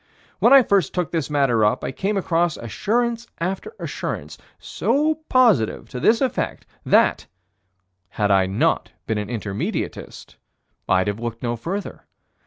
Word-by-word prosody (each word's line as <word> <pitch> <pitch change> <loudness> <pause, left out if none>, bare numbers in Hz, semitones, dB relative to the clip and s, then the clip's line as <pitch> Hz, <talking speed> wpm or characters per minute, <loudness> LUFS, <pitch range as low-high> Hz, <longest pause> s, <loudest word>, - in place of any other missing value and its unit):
When - - +4
I 275 -1 +9
first 195 - +1
took 180 -5 -1
this 160 -4 -2
matter 135 -6 +2
up, 105 - +1
I - - -2
came 195 +9 -2
across 170 -3 0
assurance 235 - -1
after 190 - -4
assurance, - - -5 0.2
so 305 +2 0
positive 230 - +3
to 125 - -6
this 225 - +3
effect, 260 -2 -2 0.2
that, - - +3 0.8
had 105 0 0
I 95 -1 +4
not 95 +3 0
been 110 -1 -1
an 105 0 -5
Intermediatist, 105 -4 -5 0.5
I'd 95 0 +3
have 105 +1 -2
looked 115 0 -5
no 120 -1 -1
further. 185 - -5
155 Hz, 145 wpm, -22 LUFS, -, 0.8 s, I